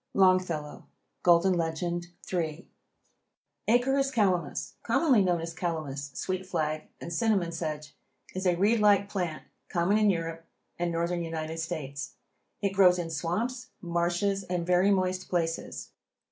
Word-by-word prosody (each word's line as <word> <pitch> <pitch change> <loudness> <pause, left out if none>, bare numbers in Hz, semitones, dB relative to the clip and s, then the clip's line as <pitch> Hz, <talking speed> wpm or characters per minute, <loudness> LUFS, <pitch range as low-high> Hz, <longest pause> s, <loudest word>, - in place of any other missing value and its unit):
—Longfellow: 185 -6 +2 0.3
Golden 175 +2 +5
Legend, 175 +1 -1 0.3
III. 165 -1 -2 1.0
Acorus 270 +4 +3
calamus, 195 -8 0
commonly 270 -10 +3
known 175 -3 +2
as 165 0 -5
Calamus, 155 -5 -3
sweet 185 0 -2
flag 155 -4 -2
and 170 - -6
cinnamon 195 -3 +1
sedge, 155 -3 -4 0.4
is 185 0 -1
a 175 - +4
reed 210 +6 +3
like 200 -1 +4
plant 175 -6 -3 0.3
common 185 +4 +2
in 210 -1 +4
Europe 165 -2 -2 0.3
and 175 0 0
Northern 170 +1 -1
United 160 0 -4
States. 145 -4 -5 0.5
It 200 -1 +1
grows 185 -2 +6
in 170 -2 -3
swamps, 215 - -2
marshes 175 +3 0
and 175 -1 -2
very 180 +2 +4
moist 185 -1 +1
places. 165 -2 -2
175 Hz, 130 wpm, -29 LUFS, 165-195 Hz, 1.0 s, grows